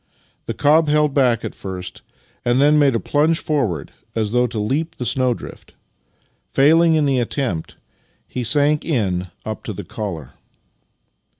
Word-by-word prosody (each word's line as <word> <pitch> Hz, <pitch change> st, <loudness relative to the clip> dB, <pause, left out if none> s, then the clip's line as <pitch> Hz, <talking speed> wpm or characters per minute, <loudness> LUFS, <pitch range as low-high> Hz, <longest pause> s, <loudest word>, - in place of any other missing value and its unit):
The -, -, -3 dB
cob 155 Hz, +2 st, +4 dB
held 150 Hz, -1 st, +2 dB
back 125 Hz, -5 st, +2 dB
at 110 Hz, -, -5 dB
first, 95 Hz, -1 st, -7 dB, 0.4 s
and 120 Hz, +1 st, +2 dB
then 150 Hz, +2 st, +5 dB
made 140 Hz, -4 st, +4 dB
a -, -, +1 dB
plunge 155 Hz, +6 st, +1 dB
forward 120 Hz, -, -2 dB, 0.2 s
as 110 Hz, -2 st, -1 dB
though 125 Hz, +1 st, +2 dB
to 115 Hz, -1 st, -6 dB
leap 140 Hz, +10 st, -1 dB
the 125 Hz, -, -5 dB
snowdrift. 125 Hz, 0 st, -2 dB, 0.7 s
Failing 160 Hz, +4 st, +4 dB
in 155 Hz, -2 st, +2 dB
the 135 Hz, -2 st, +2 dB
attempt, 120 Hz, -, -2 dB, 0.5 s
he 125 Hz, -, -4 dB
sank 145 Hz, +5 st, +2 dB
in 95 Hz, -, -1 dB, 0.2 s
up -, -, -5 dB
to -, -, -4 dB
the -, -, -7 dB
collar. 85 Hz, -, -6 dB
130 Hz, 155 wpm, -20 LUFS, 110-150 Hz, 0.7 s, then